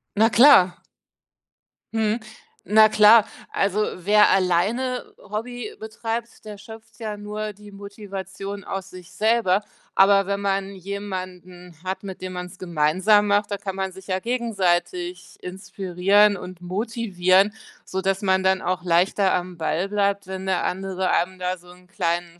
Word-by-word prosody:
Na 220 +2 +4
klar. 225 -6 +6 1.1
Mhm. 220 0 0 0.5
Na 215 +1 +6
klar. 215 +1 +7 0.3
Also, 195 +1 0 0.3
wer 210 +1 +6
alleine 200 +8 +1
Hobby 225 +2 -6
betreibt, 225 +2 -5
der 210 -1 -8
schöpft 220 +2 -13
ja 215 -2 -5
nur 210 +1 -5
die 205 +1 -15
Motivation 200 -1 -8
aus 195 0 -5
sich 185 0 -12
selber. 215 -3 +2 0.3
Aber 195 0 +5
wenn 200 0 -1
man 195 0 -1
jemanden 185 -2 -7
hat, 190 +2 -4
mit 190 -2 -8
dem 185 0 -5
man's 180 0 -7
gemeinsam 185 +5 +2
macht, 205 0 +2
da 200 - -2
kann 195 -1 -5
man 190 0 -3
sich 190 +1 -14
ja 185 -1 -1
gegenseitig 235 - -2
inspirieren 195 +2 +1
und 180 -1 -10
motivieren, 195 -1 +1 0.3
sodass 190 0 -1
man 190 -1 +2
dann 190 0 +2
auch 180 0 -2
leichter 185 +3 +2
am 180 0 -3
Ball 165 +4 -1
bleibt, 200 -1 0
wenn 190 0 -6
der 190 -2 0
andere 190 0 -2
einem 185 +2 0
da 180 0 -2
so 175 0 -19
'n 180 0 -19
kleinen 175 -2 -2
195 Hz, 145 wpm, -23 LUFS, 185-210 Hz, 1.1 s, klar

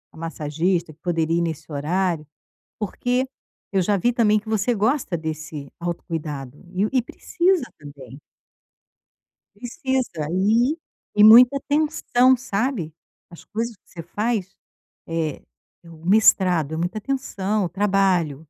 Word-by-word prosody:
massagista 165 +1 -2
que 150 - -30
poderia 165 -1 0
ir - - +1
nesse 160 -2 -4
horário, 165 +2 -1 0.5
porque 245 +5 -1 0.5
eu 195 - +2
já 200 +3 +2
vi 240 +6 +1
também 215 -3 +3
que 215 +1 -11
você 220 +2 +1
gosta 225 -2 0
desse 155 -3 -6
autocuidado 150 -6 -5
e 190 +3 +1
o - - -1
e 260 - +3
precisa 350 +6 0
também. 140 -2 -12 1.4
Precisa 245 - -3
e 225 - +2 0.4
e 210 - +6
muita 245 +5 +8
tensão, 285 -4 +3
sabe, 230 - -2 0.4
as 170 - -13
coisas 230 +2 -4
que 185 - -43
você 170 - -9
faz, 200 +2 -3 0.5
eh, 165 -3 -3 0.4
o 165 -1 -14
mestrado, 185 -7 +4
é - - -2
muita 175 +5 -2
atenção, 215 -5 -2
o - - -3
trabalho 190 -6 +1
190 Hz, 130 wpm, -23 LUFS, 160-230 Hz, 1.4 s, muita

